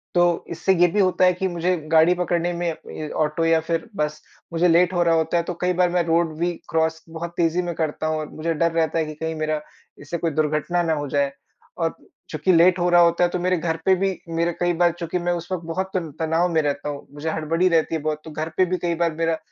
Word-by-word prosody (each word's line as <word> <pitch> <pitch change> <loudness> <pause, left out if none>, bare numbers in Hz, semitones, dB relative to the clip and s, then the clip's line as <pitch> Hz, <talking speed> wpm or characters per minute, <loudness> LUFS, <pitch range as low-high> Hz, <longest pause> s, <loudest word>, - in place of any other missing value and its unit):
तो 175 - +5 0.3
इससे 170 +3 +1
ये 175 - +6
भी 205 +5 -1
होता 185 -1 +3
है 180 - +5
कि 190 +2 -2
मुझे 175 0 0 0.2
गाड़ी 165 +2 +6
पकड़ने 175 -1 0
में 175 0 -2 0.2
ए, 155 -1 -6
ऑटो 155 +1 0
या 165 0 +4
फ़िर 165 +4 -3
बस 150 -2 -2 0.3
मुझे 170 +2 +3
लेट 175 +2 +4
हो 175 - +1
रहा 165 -1 +3
होता 160 +1 +1
है 170 - +1
तो 180 - -4
कई 180 0 +2
बार 180 0 +2
मैं 175 -1 +2
रोड 165 0 +2
भी 175 +1 +1 0.2
क्रॉस 160 0 0
बहुत 165 +1 -6
तेज़ी 170 +1 +2
में 175 -1 -3
करता 155 -1 -2
हूँ 155 0 0
और 155 - -5
मुझे 165 +1 -2
डर 170 +2 +1
रहता 165 0 0
है 160 - 0
कि 155 - -6
कहीं 160 +1 -4
मेरा 155 -1 -1 0.4
इससे 160 +4 -4
कोई 165 -1 -1
दुर्घटना 155 +3 0
ना 165 -1 +1
हो 145 -1 -3
जाए 140 0 +1 0.5
और 165 -1 0 0.4
चूँकि 155 +4 +1
लेट 175 +2 +5
हो 175 0 +2
रहा 175 0 +6
होता 170 +1 +4
है 175 - +3
तो 180 - -3
मेरे 180 +1 +1
घर 165 0 -1
पे 190 - +5
भी 190 0 -1
मेरे 170 +1 0
कई 175 0 +1
बार 175 +1 +3
चूँकि 170 +1 -2
मैं 175 0 0
उस 175 - -15
वक़्त 175 -3 -3
बहुत 190 +3 -3
तन 165 -3 -3
तनाव 165 +2 +1
में 160 - +3
रहता 145 0 -2
हूँ। 145 -1 -7
मुझे 145 +2 -4
हड़बड़ी 165 +3 +1
रहती 165 -1 +2
है 160 - -3
बहुत 155 0 -2
तो 160 - -8
घर 155 +2 -4
पे 185 - +5
भी 185 +1 -1
कई 170 -1 +1
बार 170 -1 0
मेरा 165 0 0
165 Hz, 260 wpm, -23 LUFS, 160-175 Hz, 0.5 s, ये